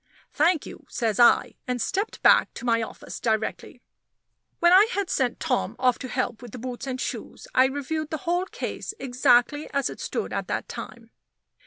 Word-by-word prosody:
"Thank 320 +1 +2
you," - - -11
says 225 -3 -1
I; 240 - +5
and 250 -1 -1
stepped 400 - -2
back - - +6
to 240 - -7
my 230 -1 +2
office 220 - -7
directly. 220 -2 -2 0.7
When 345 +1 +5
I 395 +4 +8
had 400 -2 -1
sent 255 -3 0
Tom 265 -6 -1
off 250 -1 +2
to 260 - -5
help 250 -2 -2
with 245 -4 -11
the - - -6
boots 250 +2 -6
and 260 -1 -3
shoes, - - -5
I 255 - +6
reviewed 285 +3 -3
the 315 - -2
whole 350 +2 +1
case 425 - -5
exactly 255 +2 +2
as 280 -2 0
it - - -10
stood - - -3
at - - -2
that - - -3
time. - - -9
255 Hz, 185 wpm, -25 LUFS, 245-315 Hz, 0.7 s, I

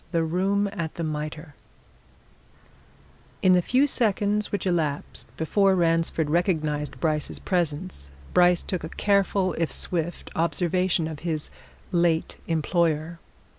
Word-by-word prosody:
THE 165 -2 +1
ROOM 195 +5 +1
AT 165 -6 -4
THE 170 - -3
MITRE 155 0 -4 1.9
In 185 - +6
the 180 - +5
few 255 +10 +3
seconds 210 -5 +1
which 205 - -2
elapsed 160 -6 -1
before 195 +4 +3
Ransford 165 -2 +1
recognized 155 -3 0
Bryce's 155 -2 -1
presence, 170 - -2 0.2
Bryce 180 -1 +4
took 185 -4 -3
a 160 - -5
careful, 195 -2 +1
if 165 - 0
swift, 175 -1 -3
observation 175 +1 +1
of 155 -2 -6
his 160 -2 -3 0.4
late 170 -2 +1
employer. 165 0 0
170 Hz, 120 wpm, -25 LUFS, 160-185 Hz, 1.9 s, In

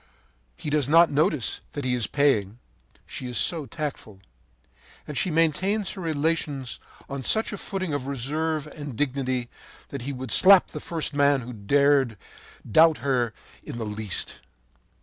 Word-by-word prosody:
He 150 - -5
does 145 -3 +1
not 165 +2 +6
notice 150 - +1
that 145 -2 -4
he 125 - +1
is 120 -4 +1
paying, 115 -8 +1 0.5
she 130 - -6
is 125 - -2
so 160 -5 +2
tactful; 145 -11 -6 0.9
and 150 - -6
she 180 - +1
maintains 175 +6 +1
her 195 - -7
relations 150 -4 -1 0.3
on 140 -1 -5
such 220 - +1
a - - -4
footing 185 -5 -3
of 140 -2 -3
reserve 150 +4 -2
and 145 -4 -8
dignity 130 -2 -1 0.4
that 140 - -6
he 135 +4 -4
would 130 -3 -6
slap 190 - +6
the - - -6
first 160 -3 -3
man 140 -1 +3
who 125 +1 -8
dared 135 +2 +2 0.5
doubt 160 +7 +5
her 125 -4 +1 0.3
in - - -7
the 115 - -3
least. 105 -2 -3
145 Hz, 155 wpm, -25 LUFS, 125-160 Hz, 0.9 s, not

